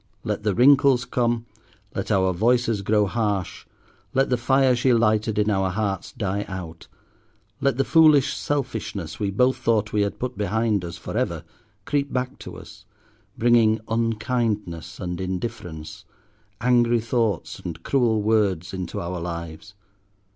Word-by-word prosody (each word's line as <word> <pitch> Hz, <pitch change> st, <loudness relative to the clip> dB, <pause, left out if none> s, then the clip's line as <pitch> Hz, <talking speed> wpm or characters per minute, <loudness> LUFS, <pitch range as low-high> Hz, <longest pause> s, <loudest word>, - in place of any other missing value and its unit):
Let -, -, -2 dB
the 105 Hz, -3 st, 0 dB
wrinkles 135 Hz, 0 st, +5 dB
come; 120 Hz, -1 st, 0 dB, 0.5 s
let -, -, -4 dB
our 95 Hz, -1 st, +2 dB
voices 115 Hz, +2 st, +2 dB
grow 105 Hz, +1 st, +2 dB
harsh; 100 Hz, -3 st, -2 dB, 0.5 s
let 135 Hz, 0 st, +2 dB
the -, -, +4 dB
fire 130 Hz, +1 st, +3 dB
she 125 Hz, +1 st, +2 dB
lighted 110 Hz, -2 st, +2 dB
in 105 Hz, 0 st, +2 dB
our 95 Hz, -1 st, +1 dB
hearts 95 Hz, -1 st, -2 dB
die 100 Hz, -1 st, -2 dB
out; 85 Hz, -4 st, -8 dB, 0.7 s
let 140 Hz, -3 st, +1 dB
the 135 Hz, -, +3 dB
foolish 155 Hz, -4 st, +5 dB
selfishness 110 Hz, -, -3 dB
we 100 Hz, -, 0 dB
both 125 Hz, +6 st, +2 dB
thought 110 Hz, -4 st, 0 dB
we 105 Hz, -, +2 dB
had 100 Hz, 0 st, -1 dB
put 125 Hz, 0 st, -4 dB
behind 105 Hz, 0 st, 0 dB
us 85 Hz, -1 st, -6 dB
for -, -, -7 dB
ever 85 Hz, -1 st, -1 dB, 0.4 s
creep 145 Hz, -1 st, -1 dB
back 125 Hz, 0 st, -3 dB
to -, -, -9 dB
us, -, -, -13 dB, 0.5 s
bringing 115 Hz, -2 st, +4 dB
unkindness 110 Hz, -7 st, -2 dB
and 90 Hz, -1 st, -4 dB
indifference, 90 Hz, -5 st, -5 dB, 0.6 s
angry 120 Hz, -1 st, +3 dB
thoughts 115 Hz, -5 st, -1 dB
and 85 Hz, -2 st, -7 dB
cruel 115 Hz, -6 st, +1 dB
words 100 Hz, -6 st, +1 dB
into 95 Hz, -2 st, -4 dB
our 90 Hz, +1 st, -4 dB
lives. 85 Hz, +3 st, -7 dB
110 Hz, 145 wpm, -24 LUFS, 95-120 Hz, 0.7 s, wrinkles